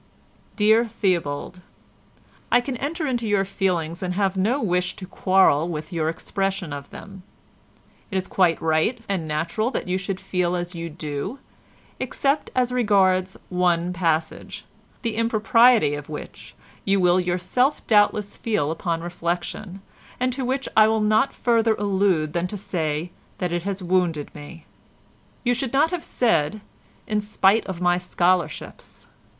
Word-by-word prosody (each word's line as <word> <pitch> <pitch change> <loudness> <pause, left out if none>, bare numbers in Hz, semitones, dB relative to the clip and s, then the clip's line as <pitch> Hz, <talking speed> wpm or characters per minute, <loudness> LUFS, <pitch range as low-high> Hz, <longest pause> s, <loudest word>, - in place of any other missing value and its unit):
"Dear 220 +2 +4
Theobald,—I 180 +2 -3
can 250 +1 -4
enter 310 +5 -3
into 240 -5 -1
your 200 -2 +2
feelings 175 -4 -1
and 180 -1 -2
have 195 -1 +1
no 215 +9 +1
wish 180 -5 0
to 190 - -8
quarrel 185 -4 +3
with 155 0 -5
your 160 -2 0
expression 195 -1 -3
of 140 0 -7
them. 195 -2 -11 0.9
It 190 - -2
is 185 - -1
quite 175 -3 +2
right 160 +10 +1
and 185 -5 -2
natural 165 +9 -1
that 260 - -4
you 185 +1 0
should 195 -1 -4
feel 180 -1 -1
as 175 0 -4
you 170 -1 -5
do 155 - -5 0.6
except 285 +1 0
as 250 -1 +2
regards 190 -6 +2
one 180 -1 +1
passage, 165 -3 -2 0.4
the 230 -2 -1
impropriety 230 -5 +4
of 145 0 -6
which 150 - -9 0.3
you 195 0 +2
will 180 0 +4
yourself 185 +10 0
doubtless 205 -1 +2
feel 160 -10 0
upon 165 0 -2
reflection, 175 +3 -4 0.4
and 255 0 +1
to 265 +1 -3
which 265 +2 -1
I 215 0 +7
will 220 0 +1
not 215 +5 +3
further 230 -2 +2
allude 190 -7 +1
than 175 +1 0
to 205 - -6
say 165 -3 -3 0.3
that 180 -2 -2
it 175 0 -1
has 195 +1 -4
wounded 175 -4 0
me. 150 +2 -11 0.8
You 245 0 +2
should 245 +1 -3
not 300 +5 +3
have 355 -3 -3
said 210 -4 +1 0.4
'in 210 -1 0
spite 210 +1 +2
of 185 -2 -5
my 175 0 +3
scholarships. 180 -1 -1
185 Hz, 150 wpm, -23 LUFS, 170-220 Hz, 0.9 s, I